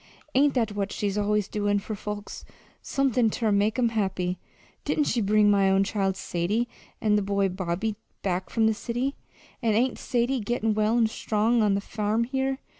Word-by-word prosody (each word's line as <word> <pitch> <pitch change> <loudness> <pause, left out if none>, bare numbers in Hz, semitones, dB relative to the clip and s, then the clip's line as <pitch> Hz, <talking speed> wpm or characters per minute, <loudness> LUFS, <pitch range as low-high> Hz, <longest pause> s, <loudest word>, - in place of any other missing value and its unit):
ain't 280 +2 +3
that 230 -4 +1
what 205 -1 -2
she's 200 -1 -2
always 210 -1 +1
doin' 205 -1 0
for 205 +2 -4
folks 205 0 -6 0.4
somethin' 255 -4 +1
ter 220 0 0
make 205 +3 +2
'em 240 -2 +3
happy? 190 -4 -1 0.4
Didn't 300 - +1
she 245 -4 0
bring 210 0 +4
my 195 -1 +4
own 195 +1 +4
child, 195 -2 -1
Sadie, 200 +9 -1 0.3
an' 210 -1 +2
the - - +2
boy, 200 0 +1
Bobby, 185 +3 -2 0.3
back 185 -1 -1
from 225 -1 +1
the 220 - +4
city, 245 +5 -2 0.5
and 225 -3 +2
ain't 250 +3 +1
Sadie 245 +2 0
gettin' 225 0 0
well 215 +2 +2
an' 235 - +4
strong 220 +1 +1
on 205 -2 +3
the 200 - -1
farm 215 +2 -1
here? 265 +2 -1
210 Hz, 185 wpm, -26 LUFS, 200-235 Hz, 0.5 s, bring